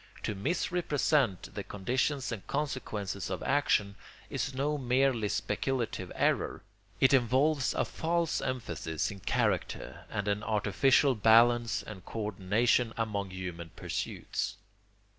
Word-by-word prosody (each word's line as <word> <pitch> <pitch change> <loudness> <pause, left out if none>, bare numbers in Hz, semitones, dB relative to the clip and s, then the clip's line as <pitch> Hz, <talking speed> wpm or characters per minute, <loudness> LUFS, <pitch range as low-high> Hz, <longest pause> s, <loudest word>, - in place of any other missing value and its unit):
To 110 - -1
misrepresent 145 - 0
the - - -4
conditions 130 +7 -1
and 110 -5 -6
consequences 120 -9 -3
of 95 - -3
action 115 -8 +2 0.4
is 135 - -2
no 145 +3 0
merely 125 -3 +2
speculative 115 -3 -2
error; - - 0 0.4
it 130 - +5
involves 135 +3 +3
a - - +1
false 170 0 0
emphasis 85 - -2
in 100 - -9
character - - -1
and 105 -1 -3
an 100 0 0
artificial 110 +6 +3
balance 115 0 +4
and 100 -4 -9
co 115 - -5
ordination 110 +5 +2
among 105 -3 -2
human 90 -3 -6
pursuits. - - -3
115 Hz, 120 wpm, -31 LUFS, 100-135 Hz, 0.4 s, it